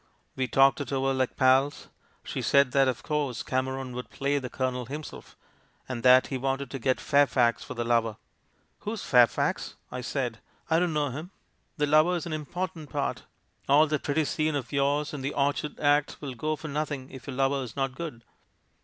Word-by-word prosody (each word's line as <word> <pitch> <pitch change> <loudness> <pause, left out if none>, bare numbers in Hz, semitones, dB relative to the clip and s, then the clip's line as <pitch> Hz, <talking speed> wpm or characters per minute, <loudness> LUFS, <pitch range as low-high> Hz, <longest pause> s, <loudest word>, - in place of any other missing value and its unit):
"We 130 -1 -1
talked 135 +4 +4
it 140 - -5
over 135 0 +1
like 130 -1 -1
pals. 130 +2 +3 0.4
She - - -4
said 140 -2 +4
that, 135 0 +4
of 130 -2 -2
course, 145 -6 -1
Cameron 130 0 -2
would 125 0 -6
play 140 +1 0
the 130 -2 -6
Colonel 125 -2 -2
him 150 +4 -5
self, - - -11 0.5
and 125 -2 -4
that 130 +1 +7
he 130 - -1
wanted 135 0 -2
to 135 - -4
get 130 +1 +1
Fairfax 130 -5 +3
for 130 - -8
the 120 - -1
lover. 115 -2 +1 0.3
" - - -41
'Who's 215 0 -5
Fairfax?' 120 -3 +3 0.2
I 125 0 -4
said; 120 -2 -3 0.3
'I 160 - +5
don't 175 -2 +1
know 150 -1 +1
him. 155 +7 -6 0.5
The 150 - +2
lover 155 +4 +4
is 175 - -3
an 170 - -4
important 160 +1 -4
part - - -2 0.2
— - - -32
all 145 +3 +7
that 150 -1 -1
pretty 150 +2 0
scene 155 +2 0
of 130 -5 -4
yours 145 +2 +1
in 145 - -5
the 140 +2 -3
Orchard 145 +1 -1
Act 145 0 +2
will 140 -3 -5
go 155 +6 -2
for 155 - -8
nothing 145 -2 -3
if 130 +1 -11
your 135 - -5
lover's 135 -3 0
not 135 -1 -1
good.' 130 -5 -7
135 Hz, 200 wpm, -28 LUFS, 130-150 Hz, 0.5 s, that